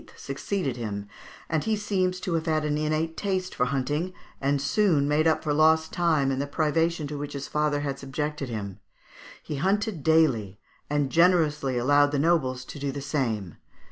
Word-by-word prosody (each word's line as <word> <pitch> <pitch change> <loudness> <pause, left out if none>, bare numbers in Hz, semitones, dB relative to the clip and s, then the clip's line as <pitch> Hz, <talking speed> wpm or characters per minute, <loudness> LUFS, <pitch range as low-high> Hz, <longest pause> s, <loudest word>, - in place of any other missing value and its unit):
succeeded 140 -1 -3
him, 100 -3 -4 0.4
and 160 -2 -1
he 220 -1 +2
seems 185 -3 -1
to 180 - -3
have 165 0 -1
had 155 -1 +1
an 150 -1 0
innate 155 +2 -1
taste 185 -2 -2
for 125 - +1
hunting, 145 +7 -1 0.3
and 140 +1 +1
soon 150 0 +2
made 150 +2 +2
up 160 - +2
for 150 - 0
lost 160 +1 +3
time 155 -6 +2
and 135 0 -1
the 140 - -3
privation 160 +2 0
to 145 0 -5
which 145 0 -5
his 140 -1 -5
father 150 -1 0
had 140 -1 -3
subjected 145 0 -4
him. 100 -4 -5 0.6
He 150 - -4
hunted 195 +2 0
daily, 130 -11 +2 0.3
and 145 -2 0
generously 155 -6 +3
allowed 145 +3 +4
the 145 - 0
nobles 135 -5 +1
to 145 - -9
do 140 0 -2
the 140 - -5
same. 120 - -2
150 Hz, 180 wpm, -26 LUFS, 135-165 Hz, 0.6 s, allowed